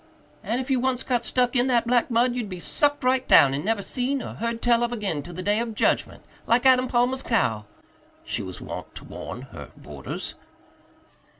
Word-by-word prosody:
"And 235 - -1
if 260 +1 -4
you 260 - +3
once 255 0 0
got 245 -2 0
stuck 250 +1 +1
in 245 +1 +3
that 240 -2 +2
black 245 +1 +2
mud 240 +1 +2
you'd 240 -4 -4
be 185 -2 -6
sucked 290 - 0
right 255 0 +1
down 135 -1 +7
and 140 - -2
never 210 0 0
seen 260 +3 -2
or - - -7
heard 230 +1 -3
tell 235 0 +3
of 240 0 0
again 200 -10 -2
till 175 +3 -10
the 185 - -5
day 205 +3 +1
of 230 -2 -3
judgment, - - 0 0.2
like 240 +3 +3
Adam 255 -1 +5
Palmer's 250 +2 +1
cow," 110 - 0 0.6
she - - -3
was 95 -1 -7
wont - - -8
to - - -8
warn - - -8
her - - -10
boarders. 70 -1 -7
240 Hz, 205 wpm, -25 LUFS, 205-255 Hz, 0.6 s, down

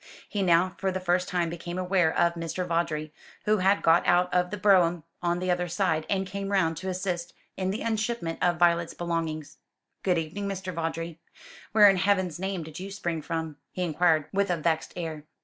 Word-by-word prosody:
He 205 - -2
now 180 0 +3
for 190 -1 0
the 185 - -2
first 180 0 +1
time 175 -2 0
became 175 +1 -6
aware 180 -3 +2
of 170 0 +3
Mr. 170 +2 -3
Vawdrey, 160 -3 -1 0.3
who 215 0 +3
had 195 +2 +3
got 165 +1 +5
out 180 +1 +3
of 180 0 +2
the 210 - -4
brougham 180 -5 +4 0.2
on 175 0 +1
the 185 0 0
other 180 0 0
side 165 -3 0
and 195 -1 +1
came 195 +1 -4
round 165 -5 +2
to 190 +4 -4
assist 180 -2 -3 0.2
in 185 -1 -1
the 205 +4 -3
unshipment 220 -6 -2
of 175 -1 +2
Violet's 170 -1 +2
belongings. 165 -3 -3 0.4
"Good 180 -2 +2
evening, 165 +6 -3
Mr. 190 -1 -4
Vawdrey. 165 0 -4 0.5
Where 210 -1 +8
in 195 -1 +5
Heaven's 185 -4 +1
name 190 -2 -2
did 155 +1 -9
you 190 +2 -6
spring 175 -5 -3
from?" 160 -1 -4 0.2
he 180 - -2
inquired, 160 -2 +2
with 200 0 +1
a 175 - +1
vexed 160 0 0
air. 160 -3 -5
175 Hz, 200 wpm, -27 LUFS, 165-190 Hz, 0.5 s, Where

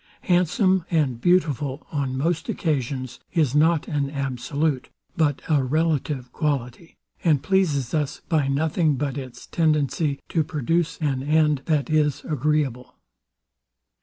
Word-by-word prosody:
Handsome 180 +1 +2
and 140 -8 0
beautiful, 150 -5 +1
on 135 -3 -2
most 160 +4 -1
occasions, 130 -5 -2
is 155 -7 +2
nor 160 +2 +4
an 145 -2 -1
absolute 140 +1 -2 0.3
but 150 -4 +1
a 150 -4 +3
relative 145 -2 -1
quality, 145 +1 -3 0.3
and 150 -5 +3
pleases 150 -9 +1
us 150 -3 -1
by 155 -4 +1
nothing 155 +2 +1
but 135 0 -2
its 130 -3 -8
tendency 150 -2 +1
to 160 - +1
produce 160 +3 -1
an 135 -4 0
end 150 0 +2
that 150 -6 +1
is 150 -2 +1
agreeable. 145 -4 -1
150 Hz, 125 wpm, -24 LUFS, 135-160 Hz, 0.3 s, nor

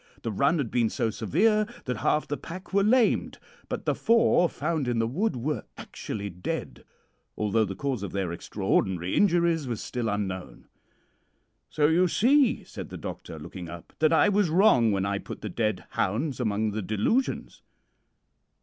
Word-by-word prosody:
The 115 - -2
run 140 - +2
had 135 -7 -2
been 115 -2 +2
so 110 - -1
severe 210 - +2 0.2
that 125 -2 -2
half 150 - +1
the 145 - -2
pack 185 +6 -9
were 200 - +4
lamed; 230 +2 +2 0.3
but - - -4
the - - +2
four 225 -6 +3
found 155 -2 -2
in 120 -1 0
the 115 - +2
wood 175 - -1
were 140 +5 -2
actually 100 -2 -6
dead, 90 -2 -5 0.5
although 110 +1 +2
the 95 -1 -5
cause 130 0 -2
of 100 - -5
their 95 -3 -2
extraordinary 95 0 -1
injuries 170 -6 +3
was 115 -3 -3
still 120 -2 -3
unknown. 95 - -4 1.0
"'So, 150 - +1
you 170 +4 +4
see,' 255 - +3
said - - -8
the - - -7
doctor, - - -7
looking 90 -3 -8
up, 85 0 -10
'that 155 0 +4
I 165 - +5
was 205 -3 +2
wrong 155 - +5
when 100 -1 0
I 100 0 -1
put - - -8
the 105 - -4
dead 110 -1 -1
hounds 130 +9 -1
among 110 -2 0
the 110 +1 -3
delusions.' 110 - -1
125 Hz, 170 wpm, -27 LUFS, 100-170 Hz, 1.0 s, I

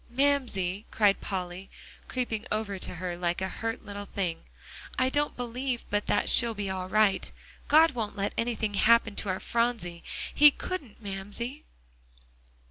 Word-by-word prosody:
"Mamsie," 240 -8 +1
cried 205 -2 +3
Polly, 185 -1 -4 0.4
creeping 240 -3 -2
over 210 -2 -1
to - - -6
her 175 0 -4
like 175 0 -1
a 190 - -1
hurt 225 +3 -4
little 205 0 -6
thing, 180 -5 -3 0.5
"I 255 0 +3
don't 290 +2 0
believe 245 +1 -3
but 205 0 0
that 205 - +2
she'll 235 -2 +4
be 200 -2 -2
all 185 -1 -4
right. 215 -1 +3 0.4
God 315 +2 +6
won't 225 -5 -3
let 200 0 -1
anything 230 -2 -1
happen 225 +1 +4
to 205 - -2
our 185 - -1
Phronsie. 230 -8 -1 0.3
He 295 0 +9
couldn't, 280 - -6
Mamsie." 205 +8 -4
215 Hz, 150 wpm, -28 LUFS, 195-245 Hz, 0.5 s, He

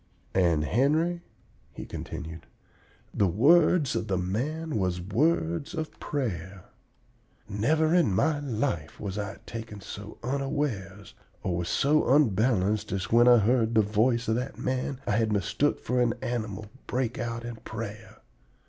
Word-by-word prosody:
"And, 85 -5 +3
Henry," 155 - +2 0.5
he - - -7
continued, 80 +2 -7 0.7
"the 100 - +2
words 150 - +4
of - - -2
the 95 -2 0
man 130 - -2
was 90 -2 0
words 95 - 0
of 160 -1 -5
prayer. 95 - -4 0.8
Never 155 +10 +1
in 175 - +4
my 145 +11 +2
life 115 - -2
was 100 -1 -4
I 100 -1 -4
taken 110 -2 -7
so 105 +1 -9
unawares 130 -8 -3 0.3
or 90 -2 -1
was 85 0 -2
so 150 -1 +2
unbalanced 110 -5 +2
as 95 -2 -3
when 120 +1 +6
I 120 -1 +8
heard 115 +1 +2
the 110 - +6
voice 115 +4 +1
of 110 - +2
that 125 +2 -4
man 130 +1 -2
I - - -1
had 110 -1 +1
mistook 105 +8 +1
for 125 0 0
an 120 -2 +2
animal 110 -4 -3 0.2
break 125 -2 -1
out 115 0 -3
in 120 -1 -6
prayer. 110 0 -8
115 Hz, 145 wpm, -28 LUFS, 100-135 Hz, 0.8 s, I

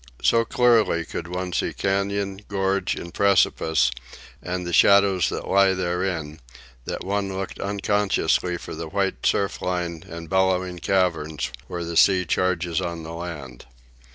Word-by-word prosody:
So 115 0 +4
clearly 110 -10 +3
could - - -6
one 90 0 -4
see - - -1
cañon, 100 0 -1
gorge, 95 -1 0
and 85 - -8
precipice, 80 -8 +3 0.5
and 90 0 -4
the 85 - -4
shadows 100 -3 +5
that - - -5
lie 95 -1 +4
therein, 90 -4 -2 0.5
that - - -4
one 100 0 -1
looked 95 -1 -5
unconsciously 100 -3 0
for - - -8
the - - -5
white - - -1
surf 100 -1 0
line 85 -3 -3
and 85 0 -8
bellowing 95 0 +1
caverns 80 -8 0 0.2
where 85 -2 -4
the 85 0 -5
sea 95 -1 +5
charges 90 -1 0
on 85 -2 -4
the 80 +1 -7
land. 75 -9 -8
90 Hz, 145 wpm, -24 LUFS, 85-100 Hz, 0.5 s, shadows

